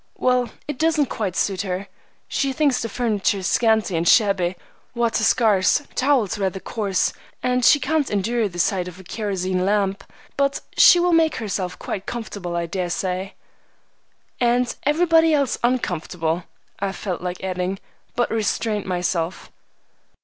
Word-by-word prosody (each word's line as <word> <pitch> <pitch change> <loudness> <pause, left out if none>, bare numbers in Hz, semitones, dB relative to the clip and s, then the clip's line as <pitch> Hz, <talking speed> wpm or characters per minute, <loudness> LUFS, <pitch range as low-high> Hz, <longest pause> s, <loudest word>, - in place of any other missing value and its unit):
"Well, 250 -2 +2 0.2
it 295 -3 -5
doesn't 310 -3 +2
quite 195 -5 -2
suit 190 -3 0
her. 190 0 -4 0.4
She 275 -2 -1
thinks 280 -2 +2
the 230 - -3
furniture 205 -4 0
scanty 220 -1 +2
and 165 +1 0
shabby, 195 -5 +3 0.4
water 235 -2 +1
scarce, 210 +5 +3
towels 255 -8 +1
rather 190 -1 -1
coarse, 200 -3 -1 0.3
and 250 0 +1
she 290 - +6
can't 295 +2 0
endure 215 +2 0
the 175 - -10
sight 180 +1 +1
of 180 0 -10
a - - -11
kerosene 185 -2 -2
lamp; 200 0 0 0.3
but 275 0 +1
she 355 - +8
will 350 0 +2
make 325 -1 +3
herself 190 -4 -3
quite 195 - -5
comfortable, 205 -7 -5
I 170 0 -1
dare 180 +1 -3
say." 185 +2 -3 1.0
"And 245 0 +2
everybody 325 0 +4
else 280 -4 0
uncomfortable," 175 -8 -1 0.3
I 195 -1 -2
felt 185 -4 -4
like 180 0 -5
adding, 185 0 -2 0.4
but 240 - 0
restrained 215 -1 -1
myself. 175 -1 -2
205 Hz, 145 wpm, -22 LUFS, 185-250 Hz, 1.0 s, she